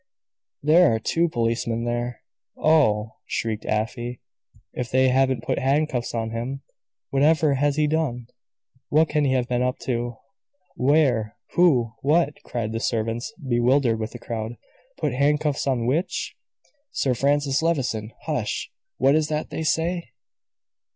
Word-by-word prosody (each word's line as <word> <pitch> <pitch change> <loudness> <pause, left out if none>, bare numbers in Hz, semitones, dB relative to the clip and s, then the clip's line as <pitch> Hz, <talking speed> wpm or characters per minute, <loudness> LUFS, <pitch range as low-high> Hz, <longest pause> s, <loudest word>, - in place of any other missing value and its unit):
There 155 -3 +5
are - - -1
two 165 +9 +1
policemen 115 -2 -1
there! 120 0 -3 0.4
Oh!" 110 -9 +2
shrieked 110 -2 -2
Afy, 120 +3 -2 0.5
"if 125 -2 -4
they 130 0 +4
haven't 130 -2 +2
put - - -1
handcuffs 135 -3 0
on 115 -1 -2
him! 130 +4 -4 0.5
Whatever 150 +1 +3
has 140 +1 +1
he 155 0 +2
done? 150 -6 -1 0.6
What 155 +2 +3
can 150 -1 +1
he 130 - +2
have 125 -2 +1
been 125 0 0
up 125 0 0
to?" 120 -2 -2 0.6
"Where? 125 -6 +2
Who? 130 -11 +3
What?" 150 +1 +2
cried 115 -3 -4
the 115 - -2
servants, 115 - -2 0.2
bewildered 120 -1 +2
with 110 0 -4
the - - -6
crowd. 115 0 -5 0.4
"Put 140 - -1
handcuffs 145 +2 +1
on 125 -4 +1
which?" 150 +9 -1 0.5
"Sir 135 - 0
Francis 140 +2 +1
Levison. 130 -10 -1
Hush! - - -2 0.3
What 135 - +4
is 155 0 +2
that 155 0 -3
they - - -3
say?" 165 -2 -1
130 Hz, 140 wpm, -24 LUFS, 115-150 Hz, 0.6 s, There